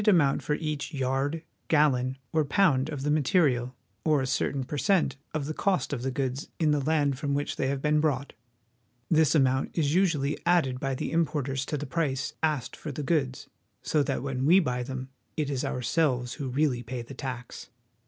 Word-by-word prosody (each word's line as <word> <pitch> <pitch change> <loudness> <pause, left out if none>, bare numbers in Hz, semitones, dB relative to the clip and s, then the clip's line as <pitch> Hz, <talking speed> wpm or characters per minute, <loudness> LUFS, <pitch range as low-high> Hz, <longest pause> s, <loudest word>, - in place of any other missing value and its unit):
amount 165 -9 +4
for 150 - 0
each 155 0 -4
yard, 135 +4 -1 0.2
gallon, 135 -4 +2 0.2
or 160 -1 +3
pound 145 -3 +2
of 145 -3 -4
the 150 - +1
material, 135 -5 +2 0.3
or 155 -2 +3
a 130 - 0
certain 135 +1 0
per 140 - -5
cent, 190 +4 +2 0.2
of 155 -3 -2
the 155 - -3
cost 185 -2 0
of 125 - -2
the 130 - -1
goods 130 +1 -3
in 155 -3 +2
the 150 - +2
land 145 -2 +1
from 140 -1 -1
which 145 +1 -2
they 135 - -1
have 135 0 -2
been 150 0 +3
brought: 140 -3 0 0.8
This 160 -1 +4
amount 130 0 +2
is 150 -3 +2
usually 160 -6 +2
added 160 -8 +2
by 135 0 -1
the - - -3
importers 145 -5 0
to 150 - -1
the 145 - -4
price 135 -3 -1
asked 155 -6 0
for 155 - -6
the 145 +2 -5
goods, 135 -4 0 0.4
so 155 - +2
that 135 -2 -1
when 135 -1 -1
we 180 +4 +7
buy 125 -8 -1
them 130 +1 -5 0.3
it 150 -2 0
is 135 -2 -1
ourselves 125 0 0
who 135 0 -4
really 130 -2 +1
pay 120 0 -5
the 120 - -10
tax. 130 -3 -6
140 Hz, 195 wpm, -28 LUFS, 130-155 Hz, 0.8 s, we